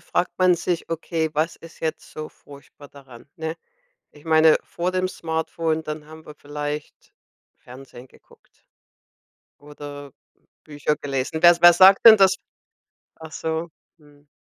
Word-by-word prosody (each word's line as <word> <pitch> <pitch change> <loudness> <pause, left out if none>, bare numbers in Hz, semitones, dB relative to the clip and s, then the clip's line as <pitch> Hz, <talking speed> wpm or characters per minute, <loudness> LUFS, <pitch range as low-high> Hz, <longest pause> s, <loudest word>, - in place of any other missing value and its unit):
fragt 175 - -2
man 185 -1 +4
sich: 170 0 -3
„Okay, 165 -1 -3
was 155 +3 -2
ist 165 0 -16
jetzt 160 -1 -5
so 155 0 -7
furchtbar 140 0 -17
daran?” 135 -2 -16
Ne? 160 +1 -5 0.6
Ich 145 +1 -20
meine 160 -1 +5
vor 175 +2 -4
dem 185 0 -1
Smartphone, 160 -2 -3
dann 150 -1 -7
haben 160 +1 -14
wir 150 - -12
vielleicht 145 +1 -7 0.4
Fernsehen 125 0 -14
geguckt - - -26 0.9
oder 145 -1 -11 0.5
Bücher 150 0 -2
gelesen. 140 +3 -4
Was 175 0 +6
wer 175 0 +9
sagt 190 +4 +6
denn 220 -2 +10
das? 190 -1 +4 0.8
Ach 160 -1 -11
so, 160 +2 -4 0.3
mhm. 145 -1 -23
155 Hz, 135 wpm, -22 LUFS, 145-165 Hz, 0.9 s, denn